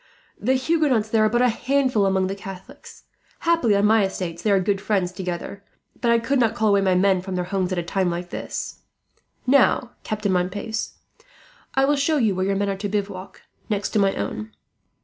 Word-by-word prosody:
"The 255 +5 +1
Huguenots 260 -5 +1
there 220 -1 +3
are - - +3
but 240 +3 +2
a 250 - +4
handful 255 -3 +1
among 190 -1 +1
the 190 - -2
Catholics. 195 -1 -11 0.4
Happily 330 -11 +3
on 200 +1 +3
my 220 0 +4
estates 180 -3 -3
they 215 - 0
are 200 -1 +4
good 195 +1 0
friends 195 -4 0
together, 180 +2 -5 0.4
but 235 - +1
I 235 - +5
could 250 +4 0
not 230 -2 +2
call 220 -2 +2
away 200 - +3
men 190 0 +3
from 190 0 -5
their 180 - -1
homes, 185 0 -1
at 185 - -1
a 175 - -1
time 185 +1 0
like 175 +1 -4
this. - - -5 0.7
"Now, 255 -1 +3
Captain 210 -2 -2
Montpace, 200 +5 -2 0.8
I 270 0 +4
will 290 +1 +3
show 300 +3 +2
you 220 -7 +2
where 185 +1 -1
your 195 - +1
men 200 0 0
are 195 - -2
to 205 +1 -3
bivouac, 195 -2 -4 0.3
next 205 -2 -1
to 215 - +1
my 195 -1 +2
own. 105 +1 -4
200 Hz, 205 wpm, -23 LUFS, 190-235 Hz, 0.8 s, I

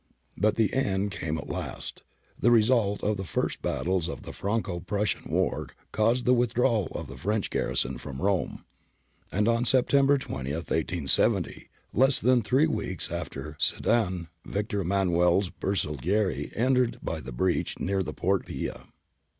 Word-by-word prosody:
But 105 +3 +2
the 110 -3 +2
end 100 -7 0
came 80 -3 -3
at 70 - -6
last. - - -5 0.4
The 120 - +4
result 110 -3 +3
of 105 0 +1
the 95 - -3
first 90 - -2
battles 90 -2 0
in - - -3
the - - -8
Franco 100 -3 -2
Prussian 100 +2 -2
war - - 0 0.2
caused 115 +4 +2
the 125 - +5
with 120 -2 +1
drawal 115 -6 +2
of - - -4
the 70 - -9
French 105 +9 -1
garrison - - 0
from 65 0 -7
Rome, 95 +2 -1 0.7
and 105 +3 +1
on 115 0 +3
Sep 130 +1 +4
tember 140 0 +4
20, 70 - -4
1870, 80 -1 0 0.2
less 135 +3 +4
than 125 0 +4
three 130 +8 +3
weeks 100 - -2
after 75 +2 -5
Sedan, 95 -7 +1 0.2
Victor 105 0 -2
Emmanuel's 90 0 +2
Hersaglieri 95 - 0
entered 125 0 +2
by - - -3
the - - -8
breach 90 +9 0
near 95 0 0
the 95 - -3
Porta - - 0
Pia. - - -5
100 Hz, 155 wpm, -27 LUFS, 85-115 Hz, 0.7 s, the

